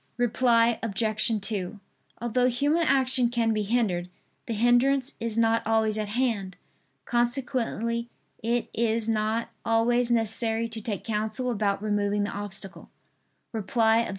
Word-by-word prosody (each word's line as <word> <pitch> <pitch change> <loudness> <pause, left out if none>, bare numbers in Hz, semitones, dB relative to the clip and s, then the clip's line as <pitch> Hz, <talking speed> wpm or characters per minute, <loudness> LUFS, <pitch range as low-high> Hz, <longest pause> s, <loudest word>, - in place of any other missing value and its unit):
Reply 235 -1 +3
Obj. 215 +1 0
2: 200 -1 -2 0.4
Although 240 +2 +1
human 285 +7 +1
action 260 -5 +2
can 230 -2 +1
be 215 - 0
hindered, 200 -5 0 0.4
the 235 - -2
hindrance 250 +4 +3
is 230 -1 -3
not 230 0 +3
always 220 -1 +2
at 215 -1 -2
hand. 210 -5 -1 0.5
Consequently 240 -1 -1 0.3
it 235 +1 0
is 225 -1 0
not 225 +1 0
always 235 +2 +2
necessary 225 0 +1
to 225 -1 -6
take 210 -1 -4
counsel 220 +3 -1
about 205 -2 0
removing 205 -1 0
the 205 - -2
obstacle. 200 -1 -7 0.6
Reply 225 +1 +2
Obj. 230 - -1
230 Hz, 130 wpm, -27 LUFS, 215-240 Hz, 0.6 s, Reply